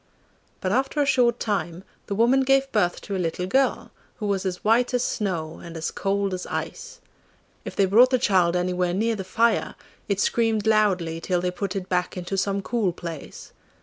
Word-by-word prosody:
But 185 - -1
after 270 +5 0
a 290 - +3
short 245 -3 +3
time 180 -4 -2 0.2
the 200 - -2
woman 240 +5 +4
gave 270 +1 +2
birth 175 -5 +1
to 200 - -5
a 185 - -1
little 175 +1 -2
girl, 265 +8 +1 0.2
who 215 - -5
was 195 -2 0
as 180 -1 -5
white 240 +3 +3
as 245 - +1
snow 170 -9 -3
and 170 -1 -8
as 160 - -3
cold 195 0 -1
as 180 -1 -5
ice. 485 0 -5 0.7
If - - -6
they 195 - +3
brought 230 +7 +6
the 255 - +3
child 185 -6 +2
anywhere 180 0 0
near 225 +3 +1
the 195 - -5
fire, 230 +5 +1 0.3
it 200 -1 0
screamed 225 -1 +1
loudly 185 -7 +2
till 180 +1 0
they 180 +1 -1
put 190 +1 -4
it 190 -2 -4
back 180 0 -1
into 180 +2 -4
some 195 0 -1
cool 220 -5 0
place. 165 -4 -8
195 Hz, 195 wpm, -24 LUFS, 180-230 Hz, 0.7 s, brought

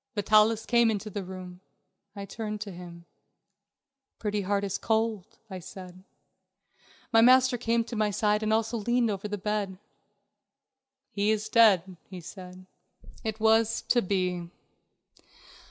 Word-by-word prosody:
Vitalis 215 +1 +3
came 235 -1 +3
into 215 0 -3
the 200 0 -4
room. 180 -1 -9 0.6
I 200 -1 -6
turned 210 +1 -5
to 210 -2 -5
him. 170 -1 -11 1.1
"Pretty 210 -1 -2
Heart 200 +1 -1
is 200 -1 -3
cold," 220 -1 -1
I 190 -3 -7
said. 185 +1 -11 1.1
My 225 - +7
master 255 +1 +5
came 230 -1 0
to 235 - -8
my 215 -1 +1
side 210 +1 +1
and 215 0 -1
also 225 +1 0
leaned 240 +1 +1
over 200 +1 -4
the 205 0 -4
bed. 205 -1 -3 1.3
"He 205 +1 0
is 215 0 0
dead," 195 -6 +4
he 185 -2 -8
said. 185 +1 -11 0.6
"It 220 -1 -4
was 220 0 +3
to 240 - +4
be. 180 -3 -2
210 Hz, 140 wpm, -28 LUFS, 190-225 Hz, 1.3 s, My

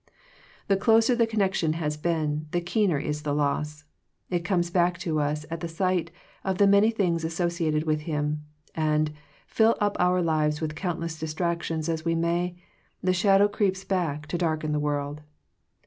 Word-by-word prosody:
The 195 - +3
closer 225 +4 +4
the 230 -1 +3
connection 195 -7 +1
has 155 -2 -2
been, 155 -1 -1
the 175 - 0
keener 175 -1 +1
is 150 +1 -3
the 145 -1 -1
loss. 150 +1 -1 0.5
It 175 -1 0
comes 175 -1 0
back 175 -1 +2
to 160 -4 -1
us 150 +1 -1
at 165 - -3
the 170 - -4
sight 175 +1 0 0.3
of 190 -1 -1
the 200 - +5
many 200 +2 +5
things 180 -7 0
associated 165 -2 0
with 155 -1 0
him, 150 0 -1 0.3
and, 155 -1 +1 0.3
fill 225 0 +3
up 205 -1 +1
our 180 0 +3
lives 155 -2 +1
with 155 -2 -3
countless 165 -1 -3
distractions 160 0 -2
as 160 -1 -2
we 165 0 +1
may, 170 +2 0 0.5
the 185 0 +3
shadow 195 +2 +4
creeps 195 -2 0
back 160 -7 -1
to 175 - -2
darken 155 -3 0
the 150 - +1
world. 145 0 -2
165 Hz, 170 wpm, -26 LUFS, 155-185 Hz, 0.5 s, the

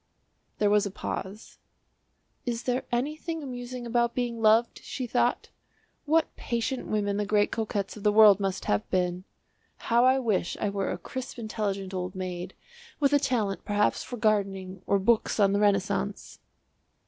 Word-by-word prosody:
There 205 -1 +2
was 210 -1 +3
a - - -4
pause. 195 +1 -6 0.8
"Is 240 -1 -3
there 250 +1 -1
anything 305 +6 -2
amusing 245 -1 -6
about 235 0 +1
being 240 -2 -2
loved?" 225 +2 +3
she 255 - -4
thought; 240 - 0 0.6
"what 315 +1 +2
patient 235 +2 -2
women 205 -1 0
the 210 - 0
great 205 0 +2
coquettes 210 -3 -2
of 210 - -10
the 210 0 +3
world 210 -2 +7
must 195 -1 -2
have 105 0 0
been! 180 0 -1 0.5
How 235 +1 +2
I 260 +1 +5
wish 220 -9 0
I 210 - 0
were 195 -1 -2
a - - -3
crisp 260 -1 -7
intelligent 200 -4 -3
old 185 0 -4
maid, 185 0 -5 0.4
with 285 -1 +3
a 285 - +6
talent 225 -8 -1
perhaps 205 0 +1
for 245 - -7
gardening 195 -4 0
or 200 - +3
books 220 +3 +1
on 200 -1 +4
the 200 - +2
Renaissance!" 195 - 0
215 Hz, 160 wpm, -27 LUFS, 195-245 Hz, 0.8 s, world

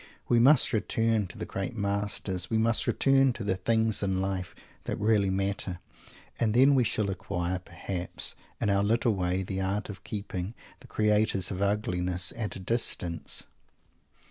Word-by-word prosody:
We 120 - +4
must 135 +3 +5
return 110 -1 +1
to - - -9
the - - -4
great 95 +5 -4
masters; 100 -3 -1
we 110 - +1
must 115 +1 +2
return 135 -1 +3
to 115 - -6
the 95 -2 0
things 110 +3 +1
in 95 -2 0
life 95 -2 -3 0.3
that - - -3
really 105 -2 +2
matter; 95 -1 -2 0.6
and 110 -1 +1
then 135 +3 +6
we 130 -2 +4
shall 105 -3 0
acquire, 90 -1 -3
perhaps, 90 0 -1 0.2
in 105 - +1
our 100 0 +3
little 115 +2 +2
way 90 0 -1
the 95 +1 -3
art 100 +3 -2
of 100 - -9
keeping 100 -1 -5 0.2
the - - -15
creators 105 -3 +1
of 95 0 -4
ugliness 90 -3 0
at 110 -3 -3
a - - -6
distance! 90 -6 -2
100 Hz, 165 wpm, -28 LUFS, 95-110 Hz, 0.6 s, then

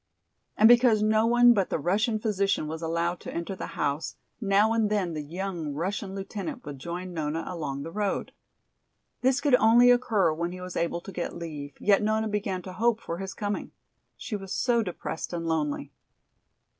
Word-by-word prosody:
And 220 - +7
because 235 -3 +6
no 215 +1 +3
one 240 +1 +6
but 195 -4 0
the - - 0
Russian 205 +8 +1
physician 200 -6 0
was 160 +1 -5
allowed 170 +1 -1
to - - -8
enter 170 +3 -4
the - - -6
house, 145 +2 -1 0.3
now 205 +2 +3
and 225 -2 +2
then 195 -5 0
the 155 - -3
young 165 -1 -4
Russian 190 +4 -3
lieutenant 210 +7 -5
would 145 -2 -7
join 175 +4 -5
Nona 160 0 -2
along 145 -6 -4
the 165 - -7
road. 205 +1 -2 0.9
This 260 +1 +3
could 290 -3 +1
only 240 +1 +7
occur 220 -9 +3
when 170 +2 -3
he 185 - -8
was 180 0 -7
able 170 0 -1
to 195 - -9
get 180 -2 -4
leave, 150 -4 -7
yet 200 -1 +4
Nona 220 +1 +1
began 200 -3 -2
to 185 - -8
hope 230 +2 +1
for 170 -5 -5
his 195 0 -5
coming. 205 -1 -3 0.4
She 245 -4 -5
was 195 -2 -7
so 240 -2 +2
depressed 180 -4 -5
and 170 -1 -3
lonely. 150 -3 -1
195 Hz, 185 wpm, -27 LUFS, 165-215 Hz, 0.9 s, And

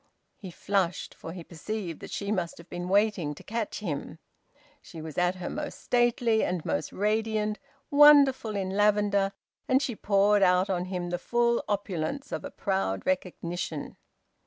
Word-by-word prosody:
He 190 - -9
flushed, 185 0 -1
for 165 - -9
he 175 0 -8
perceived 175 +1 -5
that - - -9
she 200 0 -3
must 180 -5 -2
have 170 - -13
been 175 +1 -5
waiting 195 -7 +2
to - - -13
catch 225 -2 -3
him. 155 -4 -4 0.6
She 165 - -11
was 155 -2 -7
at 180 +1 +2
her 180 -1 -6
most 295 0 -5
stately 240 -2 +2
and 180 -3 -2
most 80 0 -2
radiant, 215 +1 0 0.3
wonderful 280 -6 +6
in 190 -1 -2
lavender, 205 -1 +2 0.4
and 260 0 +4
she 255 -4 -2
poured 205 0 +3
out 185 +1 +4
on 180 -1 -1
him 180 -2 -4
the 175 - -1
full 235 +3 +1
opulence 200 - -2
of - - -3
a 285 - -5
proud 190 - -2
recognition. 175 -4 -3
195 Hz, 160 wpm, -28 LUFS, 175-220 Hz, 0.6 s, wonderful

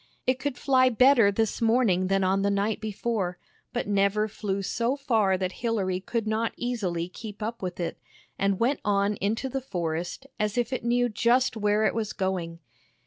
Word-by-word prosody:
It 255 0 +1
could 275 -2 -3
fly 255 -2 +4
better 250 -3 +5
this 220 +2 -1
morning 225 -6 +3
than 195 0 +2
on 190 +1 +2
the 200 - +2
night 200 +2 0
before, 210 -4 -2 0.3
but 245 -3 -2
never 200 +1 +2
flew 200 -2 -3
so 235 +6 0
far 220 -9 +2
that 185 -1 -2
Hilary 200 -6 0
could 225 +4 -3
not 220 +1 0
easily 190 -9 -2
keep 210 +3 -8
up 230 +2 -4
with 180 -1 -4
it, 170 -1 -3 0.4
and 195 -1 +1
went 255 +5 +2
on 200 0 +2
into 220 +6 -1
the 270 +1 -3
forest 175 -1 -3
as 210 +1 -1
if 240 +1 0
it 255 - -3
knew 245 +1 +2
just 240 +3 +2
where 210 0 +1
it - - +2
was 220 -2 -2
going. 180 -3 -2
210 Hz, 185 wpm, -27 LUFS, 195-235 Hz, 0.4 s, better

